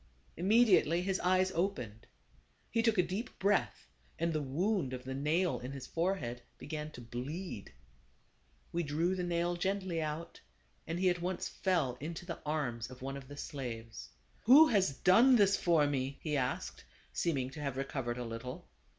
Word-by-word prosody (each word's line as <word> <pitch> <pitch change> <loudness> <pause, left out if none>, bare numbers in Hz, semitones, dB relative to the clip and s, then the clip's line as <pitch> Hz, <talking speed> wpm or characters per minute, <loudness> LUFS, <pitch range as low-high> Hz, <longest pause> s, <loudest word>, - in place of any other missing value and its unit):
Immediately 190 -3 +4
his 190 0 0
eyes 185 +1 +3
opened. 130 - -2 0.6
He 230 - +2
took 225 -2 +2
a 180 - +5
deep 195 +8 -4
breath, 200 +1 +1 0.3
and 170 0 0
the 155 - 0
wound 155 +1 0
of 125 -1 -5
the 130 +1 -5
nail 155 +6 +1
in 125 +2 -6
his 135 -2 -7
forehead 165 -9 -2 0.2
began 150 -1 -5
to 120 - -9
bleed. 125 - -6 1.0
We 170 - 0
drew 165 +4 0
the 185 - -2
nail 175 0 0
gently 190 -2 -1
out, 155 +2 -5 0.5
and 165 +2 -2
he 185 -1 +4
at 175 -1 -3
once 180 +1 -2
fell 165 -10 0
into 165 +4 -6
the 170 -2 -5
arms 125 -7 -2
of 130 0 -11
one 135 +1 -4
of 135 -1 -8
the 145 +1 -10
slaves. 120 -7 -6 0.2
" - - -35
Who 275 +8 +9
has 195 -8 +3
done 235 +8 +6
this 200 -3 +5
for 165 -4 +3
me? 135 -1 -1
" - - -37
he 150 -2 -1
asked, 130 -2 -2 0.3
seeming 135 -7 0
to 140 - -9
have 140 -3 -3
recovered 135 -3 -3
a 125 - -4
little. 125 +8 -6
160 Hz, 175 wpm, -33 LUFS, 130-185 Hz, 1.0 s, Who